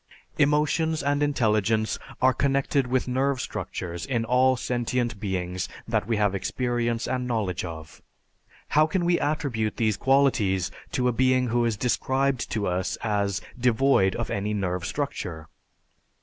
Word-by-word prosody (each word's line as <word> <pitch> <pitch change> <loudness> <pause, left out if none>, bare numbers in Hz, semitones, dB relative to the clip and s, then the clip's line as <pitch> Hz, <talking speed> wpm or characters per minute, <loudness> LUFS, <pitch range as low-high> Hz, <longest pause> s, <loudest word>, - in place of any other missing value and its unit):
Emotions 150 +2 +2
and 145 +1 +1
intelligence 110 -6 +1 0.2
are 130 0 +6
connected 140 -1 +1
with 130 +1 0
nerve 130 +1 0
structures 85 -7 -5
in 115 -4 -1
all 130 +2 +4
sentient 120 -2 -1
beings 90 -2 -3 0.2
that 110 -2 0
we 115 -2 +1
have 105 -2 +2
experience 120 +2 -1
and 125 0 -2
knowledge 105 -7 -1
of. 80 -3 -8 0.7
How 155 +1 +4
can 175 +1 0
we 175 0 +3
attribute 130 -8 -1
these 110 -3 +1
qualities 110 -9 +2 0.2
to 125 -1 +1
a - - +3
being 130 +1 +2
who 120 +1 +2
is 115 -3 0
described 130 +2 0
to 105 -2 -1
us 90 0 -1
as 100 -3 0 0.2
devoid 125 -5 +3
of 115 -2 -3
any 105 +1 -1
nerve 90 -3 -2
structure? 90 - -4
120 Hz, 145 wpm, -26 LUFS, 100-135 Hz, 0.7 s, are